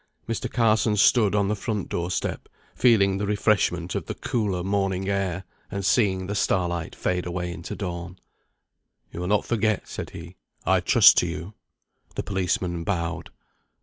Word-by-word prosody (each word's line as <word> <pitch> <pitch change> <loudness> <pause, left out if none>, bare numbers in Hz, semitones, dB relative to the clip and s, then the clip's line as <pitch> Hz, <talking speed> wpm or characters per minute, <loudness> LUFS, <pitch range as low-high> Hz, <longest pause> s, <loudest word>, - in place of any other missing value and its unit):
Mr. 115 - -3
Carson 110 -2 +2
stood 105 0 +4
on 100 -1 +2
the 105 - 0
front 105 -2 -3
door 85 0 -3
step, - - -3 0.2
feeling 100 -6 +3
the 100 - -2
refreshment 100 -4 +1
of - - -3
the - - -4
cooler 100 -6 -1
morning 95 -1 -1
air, 95 -2 -1 0.3
and 100 -2 -4
seeing 95 -3 +2
the 100 - -3
starlight 85 -4 -1
fade 90 -1 -1
away 90 0 -3
into 80 0 -7
dawn. 90 -2 -5 0.9
"You - - -7
will 90 - -3
not 105 +2 +2
forget," 110 -3 0
said - - -6
he. 85 +2 -10 0.3
"I - - +4
trust - - +6
to - - 0
you." 90 +6 -6 0.6
The - - -2
policeman 90 -3 -1
bowed. 85 -1 -2
95 Hz, 160 wpm, -25 LUFS, 90-105 Hz, 0.9 s, trust